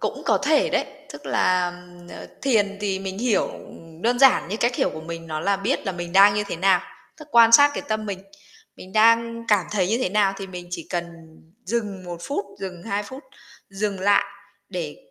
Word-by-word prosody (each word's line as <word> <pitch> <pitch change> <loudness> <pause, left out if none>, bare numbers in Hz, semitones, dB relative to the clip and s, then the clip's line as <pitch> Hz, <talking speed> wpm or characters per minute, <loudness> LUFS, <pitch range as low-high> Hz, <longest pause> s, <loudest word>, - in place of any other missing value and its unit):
cũng - - -3
có - - +2
thể - - +2
đấy. - - +1 0.3
Tức - - -11
là, 180 -1 +2
ừm, 175 0 -15
ờ, - - -10 0.2
thiền 205 -7 +1
thì 195 -2 -1
mình 190 0 -6
hiểu, 235 -2 +1
ừm, 165 0 -13
đơn 245 +2 +1
giản 265 -9 +5
như 205 - -3
cách 240 +2 0
hiểu - - +1
của 155 - -8
mình 165 +1 -8
nó 155 -1 -4
là 200 +4 +1
biết 205 +8 -2
là 195 - -1
mình 175 -1 -6
đang 200 +1 +7
như 210 0 -1
thế 200 - -5
nào, 185 +1 +3 0.4
tức 305 -1 -13
quan 230 -2 +6
sát 285 +4 +8
cái - - -4
tâm 215 0 -2
mình. 200 -2 -4 0.6
Mình 185 - -12
đang 230 +2 +3
cảm 205 -5 +3
thấy 195 -4 +1
như 225 +4 +1
thế 255 - 0
nào 200 0 +2
thì 195 - -7
mình 180 -2 -9
chỉ 170 -2 -6
cần 175 -1 -1 0.6
dừng 205 -3 -3
1 175 -1 -6
phút, 270 +1 -3
dừng 180 -3 -7
2 205 0 -2
phút, 260 +7 -10 0.5
dừng 195 -1 -3
lại 200 +1 +3 0.4
để 170 -6 -5
195 Hz, 220 wpm, -23 LUFS, 180-220 Hz, 0.6 s, sát